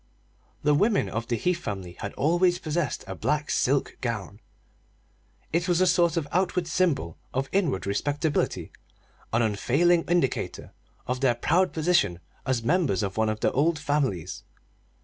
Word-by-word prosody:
The 150 Hz, 0 st, +4 dB
women 205 Hz, +8 st, +2 dB
of 115 Hz, +1 st, -4 dB
the 120 Hz, -, 0 dB
Heath 180 Hz, +7 st, 0 dB
family 95 Hz, -, -5 dB
had 100 Hz, -, -5 dB
always 175 Hz, +4 st, +3 dB
possessed 160 Hz, -1 st, -2 dB
a -, -, -5 dB
black 150 Hz, 0 st, -1 dB
silk 135 Hz, +2 st, +1 dB
gown. 105 Hz, -4 st, -4 dB, 1.1 s
It 170 Hz, +2 st, +1 dB
was 175 Hz, -1 st, +2 dB
a 185 Hz, -, +4 dB
sort 175 Hz, -2 st, +3 dB
of 155 Hz, -3 st, -1 dB
outward 180 Hz, 0 st, +1 dB
symbol 160 Hz, -, 0 dB, 0.2 s
of 135 Hz, +1 st, 0 dB
inward 170 Hz, -, 0 dB
respectability 145 Hz, +9 st, -1 dB, 0.6 s
an 115 Hz, +1 st, +2 dB
unfailing 150 Hz, +11 st, +2 dB
indicator 170 Hz, -7 st, -1 dB, 0.3 s
of 125 Hz, +1 st, -2 dB
their 125 Hz, -3 st, +3 dB
proud 180 Hz, +9 st, +2 dB
position 155 Hz, -, +2 dB, 0.3 s
as 130 Hz, -3 st, 0 dB
members 145 Hz, -, +1 dB
of 95 Hz, -1 st, -3 dB
one 110 Hz, 0 st, +1 dB
of 110 Hz, 0 st, -3 dB
the -, -, +2 dB
old 155 Hz, +4 st, +2 dB
families. 145 Hz, -, -1 dB
145 Hz, 150 wpm, -26 LUFS, 115-175 Hz, 1.1 s, The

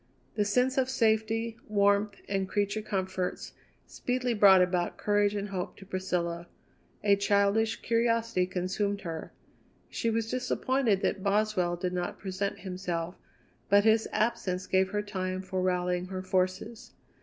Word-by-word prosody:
The 210 Hz, -, 0 dB
sense 250 Hz, +6 st, +2 dB
of 260 Hz, -1 st, +1 dB
safety, 225 Hz, -1 st, +1 dB
warmth, 200 Hz, -1 st, +2 dB
and 195 Hz, -1 st, -1 dB
creature 205 Hz, +1 st, 0 dB
comforts 190 Hz, -3 st, -3 dB, 0.3 s
speedily 250 Hz, -1 st, -2 dB
brought 195 Hz, -4 st, +7 dB
about 180 Hz, -1 st, -1 dB
courage 205 Hz, 0 st, +2 dB
and 205 Hz, 0 st, -3 dB
hope 185 Hz, -2 st, -4 dB
to 195 Hz, -, -12 dB
Priscilla; 175 Hz, -3 st, -2 dB, 0.6 s
a 200 Hz, -1 st, +5 dB
childish 200 Hz, +2 st, +1 dB
curiosity 230 Hz, -5 st, +1 dB
consumed 195 Hz, +3 st, -2 dB
her; 165 Hz, -3 st, -6 dB, 0.6 s
she 230 Hz, -, -1 dB
was 225 Hz, 0 st, -1 dB
disappointed 255 Hz, -4 st, +1 dB
that 195 Hz, -, 0 dB
Boswell 200 Hz, -3 st, +1 dB
did 180 Hz, +1 st, -3 dB
not 180 Hz, -1 st, -3 dB
present 195 Hz, 0 st, -3 dB
himself, 180 Hz, -2 st, -3 dB, 0.6 s
but 200 Hz, 0 st, +6 dB
his 220 Hz, 0 st, +3 dB
absence 190 Hz, -4 st, -1 dB
gave 190 Hz, 0 st, +2 dB
her 205 Hz, +1 st, -2 dB
time 185 Hz, -2 st, -3 dB
for 185 Hz, 0 st, -3 dB
rallying 180 Hz, -1 st, 0 dB
her 185 Hz, 0 st, -5 dB
forces. 185 Hz, +4 st, -2 dB
200 Hz, 140 wpm, -29 LUFS, 185-220 Hz, 0.6 s, brought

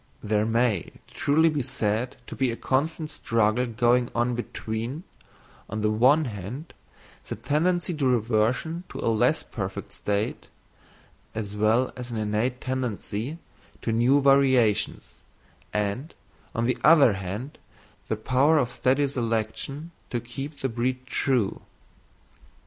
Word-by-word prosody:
There 105 Hz, 0 st, +1 dB
may 115 Hz, -4 st, +1 dB
truly 145 Hz, +4 st, +2 dB
be 150 Hz, -3 st, +1 dB
said 110 Hz, +1 st, -1 dB
to -, -, -8 dB
be 130 Hz, -2 st, +1 dB
a 115 Hz, -, -2 dB
constant 155 Hz, +5 st, -1 dB
struggle 115 Hz, +1 st, +1 dB
going 120 Hz, +1 st, +2 dB
on 120 Hz, +1 st, +1 dB
between, 120 Hz, +4 st, -4 dB, 0.7 s
on 110 Hz, +1 st, -3 dB
the 105 Hz, 0 st, +2 dB
one 130 Hz, +8 st, +4 dB
hand, 115 Hz, -, -6 dB, 0.5 s
the -, -, -4 dB
tendency 175 Hz, +4 st, 0 dB
to 145 Hz, -4 st, 0 dB
reversion 120 Hz, +8 st, +1 dB
to -, -, -7 dB
a 115 Hz, -, +1 dB
less 110 Hz, -, +2 dB
perfect -, -, -5 dB
state, 105 Hz, +1 st, -2 dB, 0.9 s
as 105 Hz, -2 st, -4 dB
well 110 Hz, +5 st, +2 dB
as 125 Hz, -1 st, -7 dB
an 115 Hz, -, -4 dB
innate 110 Hz, +4 st, 0 dB
tendency 130 Hz, +1 st, -3 dB, 0.5 s
to 115 Hz, -, 0 dB
new 120 Hz, +5 st, +4 dB
variations, 130 Hz, -6 st, +3 dB, 0.5 s
and, 105 Hz, +9 st, -2 dB, 0.4 s
on 115 Hz, 0 st, +1 dB
the 125 Hz, -, 0 dB
other 150 Hz, -8 st, +7 dB
hand, 100 Hz, +9 st, -5 dB, 0.5 s
the -, -, 0 dB
power 130 Hz, +8 st, +3 dB
of 125 Hz, -4 st, +1 dB
steady 135 Hz, +3 st, +2 dB
selection 125 Hz, +5 st, -2 dB, 0.2 s
to 120 Hz, -, -1 dB
keep 135 Hz, +5 st, -7 dB
the 135 Hz, -, -1 dB
breed 125 Hz, +2 st, -2 dB
true. 125 Hz, -5 st, 0 dB
125 Hz, 130 wpm, -26 LUFS, 110-135 Hz, 0.9 s, other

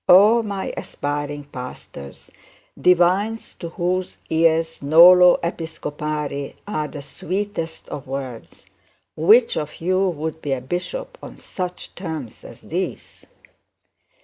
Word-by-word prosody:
Oh! 210 Hz, +6 st, +7 dB
my 200 Hz, -3 st, -4 dB
aspiring 145 Hz, 0 st, -4 dB
pastors, 125 Hz, -, -10 dB, 0.4 s
divines 185 Hz, +5 st, +2 dB
to 170 Hz, -, -5 dB
whose 180 Hz, +2 st, -2 dB
ears 165 Hz, 0 st, +2 dB
nolo 175 Hz, +5 st, +8 dB
episcopari 150 Hz, -4 st, -4 dB
are 155 Hz, -7 st, -2 dB
the 145 Hz, -2 st, -8 dB
sweetest 170 Hz, +2 st, -4 dB
of 140 Hz, -, -7 dB
words, 130 Hz, -10 st, -7 dB, 0.5 s
which 215 Hz, +10 st, +5 dB
of 150 Hz, -1 st, -4 dB
you 185 Hz, +3 st, +1 dB
would 160 Hz, -1 st, -4 dB
be 140 Hz, -, -1 dB
a 130 Hz, -, -3 dB
bishop -, -, -5 dB
on -, -, -10 dB
such 180 Hz, -1 st, -6 dB
terms 160 Hz, -, -6 dB
as -, -, -12 dB
these? -, -, -5 dB
165 Hz, 115 wpm, -22 LUFS, 145-185 Hz, 0.5 s, nolo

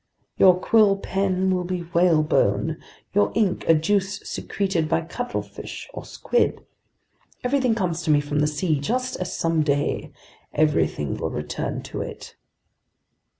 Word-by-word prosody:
Your 180 Hz, -1 st, +6 dB
quill 205 Hz, 0 st, +4 dB
pen 190 Hz, -1 st, 0 dB
will 180 Hz, -1 st, 0 dB
be 180 Hz, 0 st, -3 dB
whalebone, 160 Hz, -, +2 dB, 0.3 s
your 205 Hz, +1 st, +3 dB
ink 210 Hz, -5 st, +1 dB
a 165 Hz, -, +6 dB
juice 195 Hz, +4 st, 0 dB
secreted 190 Hz, -6 st, -2 dB
by 165 Hz, -, +2 dB
cuttlefish 245 Hz, +9 st, -6 dB
or -, -, -7 dB
squid. 480 Hz, -, 0 dB, 0.8 s
Everything 250 Hz, -2 st, +2 dB
comes 175 Hz, -5 st, -1 dB
to 160 Hz, -, -4 dB
me 150 Hz, -1 st, +5 dB
from 145 Hz, 0 st, -2 dB
the 150 Hz, -, +3 dB
sea, 150 Hz, 0 st, 0 dB
just 250 Hz, -, -1 dB
as 180 Hz, -1 st, -4 dB
someday 150 Hz, -4 st, 0 dB, 0.4 s
everything 80 Hz, -, +1 dB
will -, -, -2 dB
return 75 Hz, 0 st, -4 dB
to -, -, -5 dB
it!" -, -, -8 dB
180 Hz, 135 wpm, -24 LUFS, 155-195 Hz, 0.8 s, Your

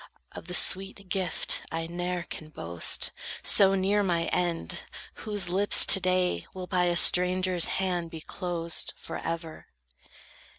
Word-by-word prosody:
Of -, -, -11 dB
the 180 Hz, -, -1 dB
sweet 195 Hz, +1 st, +2 dB
gift 185 Hz, -3 st, 0 dB
I 165 Hz, 0 st, -4 dB
ne'er 175 Hz, +1 st, -4 dB
can 155 Hz, -2 st, -10 dB
boast, 85 Hz, -, 0 dB, 0.3 s
so 195 Hz, -1 st, +4 dB
near 195 Hz, +2 st, +1 dB
my 175 Hz, -4 st, 0 dB
end, 175 Hz, -2 st, -2 dB, 0.5 s
whose 205 Hz, -3 st, +2 dB
lips 195 Hz, +3 st, +6 dB
To 195 Hz, -, +6 dB
day 180 Hz, -, -1 dB
will 185 Hz, -1 st, -6 dB
by 180 Hz, -1 st, 0 dB
a 175 Hz, 0 st, 0 dB
stranger's 180 Hz, 0 st, +2 dB
hand 180 Hz, -3 st, -2 dB
be 160 Hz, -1 st, -9 dB
closed 170 Hz, -1 st, -3 dB
Forever." 165 Hz, -1 st, -7 dB
180 Hz, 135 wpm, -27 LUFS, 170-185 Hz, 0.5 s, lips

